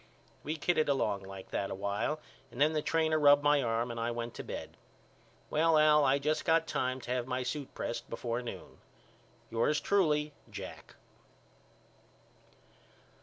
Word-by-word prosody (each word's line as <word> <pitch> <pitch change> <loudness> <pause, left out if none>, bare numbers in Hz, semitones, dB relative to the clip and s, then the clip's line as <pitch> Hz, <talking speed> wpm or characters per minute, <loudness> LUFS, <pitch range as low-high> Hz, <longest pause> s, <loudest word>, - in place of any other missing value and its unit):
We 155 +3 -3
kidded 155 -1 +1
along 105 -8 +1
like 95 0 -10
that 100 - -1
a - - -4
while 100 +10 -2 0.3
and 120 - -10
then 150 +2 +4
the 155 - 0
trainer 160 0 +1
rubbed 145 -1 +6
my 145 -1 +4
arm 115 0 -1
and 115 - -5
I 115 +1 -1
went 120 0 -4
to - - -7
bed. - - -7 0.8
Well 160 +1 +4
Al 150 -1 +6
I 135 0 +4
just 150 +2 0
got 165 0 +3
time 130 -4 -1
to 120 - -6
have 125 -1 -1
my 130 0 -1
suit 135 +2 -5
pressed 120 - -4
before 120 +1 -3
noon. 120 - -9 0.7
Yours 120 +7 +2
truly, 150 -7 +1 0.2
JACK. - - -9
140 Hz, 160 wpm, -32 LUFS, 120-155 Hz, 0.8 s, rubbed